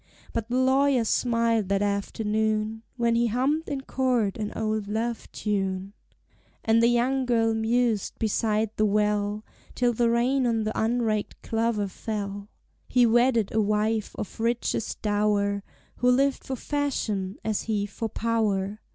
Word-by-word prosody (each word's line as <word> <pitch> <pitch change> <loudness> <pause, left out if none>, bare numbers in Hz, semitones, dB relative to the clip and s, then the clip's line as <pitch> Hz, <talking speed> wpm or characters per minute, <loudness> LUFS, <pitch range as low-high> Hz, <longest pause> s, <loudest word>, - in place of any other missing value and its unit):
But 230 0 -3
the 250 - 0
lawyers 260 -2 +3
smiled 230 -4 +1
that 200 0 +2
afternoon, 215 +2 -1 0.2
When 235 -1 +2
he 235 +1 +2
hummed 270 +8 0
in 280 -2 -2
court 250 -7 0
an 210 -1 -3
old 215 -2 -1
love 225 +2 -3
tune; 195 -2 -2 0.7
And 225 +1 +4
the 230 - +5
young 250 +2 +1
girl 225 -2 +2
mused 225 -1 0
beside 215 0 0
the 215 - +3
well, 210 0 0 0.3
Till 245 -1 +2
the 235 +1 +2
rain 250 +3 +2
on 225 -2 +1
the 215 0 -3
unraked 220 -2 -1
clover 225 -2 0
fell. 200 0 -5 0.4
He 245 -1 +4
wedded 235 -2 +3
a 220 - +3
wife 210 +1 0
of 210 - -6
richest 230 -1 -1
dower, 205 -1 +1 0.4
Who 250 - +3
lived 275 +2 +2
for 265 - -3
fashion, 220 -9 -2
as 215 -2 0
he 205 -2 +1
for 220 +2 -5
power. 215 -3 -1
225 Hz, 145 wpm, -26 LUFS, 210-240 Hz, 0.7 s, the